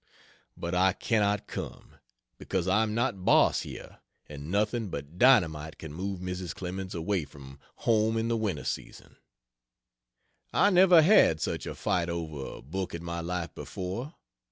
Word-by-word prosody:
But 85 +1 -4
I 95 +1 +4
cannot 105 -2 0
come, - - -8 0.4
because 95 -1 -2
I 95 +4 +3
am 110 -1 -1
not 115 -6 -1
Boss - - +4
here, - - -9 0.3
and 75 0 -8
nothing 105 +3 0
but 70 +3 -7
dynamite 80 - +4
can 80 -2 -8
move 95 +2 -4
Mrs. 90 -1 -4
Clemens 95 0 -5
away 85 +1 -1
from 70 -1 -13 0.2
home 110 0 +2
in 115 0 0
the 115 - +1
winter 105 -9 -2
season. - - -6 1.3
I 205 - +4
never 180 -3 +7
had 150 - +5
such - - -3
a - - -5
fight 85 -1 0
over 80 -5 -4
a - - -13
book 90 +6 -4
in 85 - -7
my 85 0 -4
life 85 0 -4
before. 115 - -6
95 Hz, 155 wpm, -29 LUFS, 85-110 Hz, 1.3 s, never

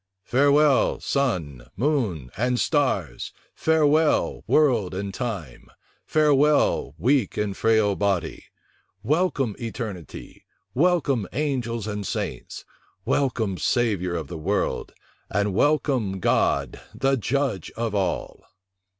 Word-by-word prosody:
"Farewell, 140 +3 +3
sun, 85 - -2
moon, 105 - -1
and 125 +5 0
stars; 100 - 0 0.2
farewell, 155 -1 +2
world 120 -12 +2
and 100 0 -4
time; 95 - -5 0.4
farewell, 150 - +3
weak 125 - +1
and 105 -2 -1
frail 110 -2 +2
body: 100 -4 -1 0.6
welcome, 140 - 0
eternity; 110 - -7 0.3
welcome, 145 - +2
angels 125 -6 -2
and 105 -2 -4
saints; - - -5 0.4
welcome, 110 - 0
Savior 90 - 0
of 80 -2 -3
the 80 +2 -7
world; 100 +6 -1 0.4
and 100 +1 0
welcome, 130 -6 +1
God, 70 -6 +1
the 135 +1 +2
Judge 130 - -1
of 115 -2 -2
all!" 100 -3 -2
115 Hz, 100 wpm, -24 LUFS, 95-140 Hz, 0.6 s, Farewell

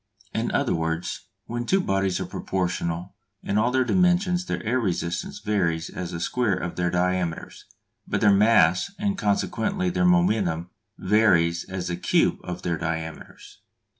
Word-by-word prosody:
In - - -1
other - - +1
words, 80 +1 -3 0.2
when 120 +1 -4
two 195 - +3
bodies 95 - 0
are - - -3
proportional 90 -1 -3 0.3
in 100 - 0
all 115 +3 +2
their 130 +1 +2
dimensions 180 +3 +2
their - - -3
air 125 +4 +1
resistance 85 -5 -2
varies 85 -6 -1
as 90 -2 -5
the 85 - -5
square 115 +2 0
of 90 -1 -4
their 90 0 0
diameters, 90 -1 -2 0.4
but - - -1
their 105 -2 +5
mass 100 - +4
and 200 -1 -1
consequently 180 - 0
their 180 - 0
momentum 105 - +2 0.3
varies 90 -5 +3
as 95 -1 -5
the 85 - -2
cube - - +2
of 90 0 -6
their 85 -1 -1
diameters. 80 -1 -6
95 Hz, 155 wpm, -25 LUFS, 85-120 Hz, 0.4 s, their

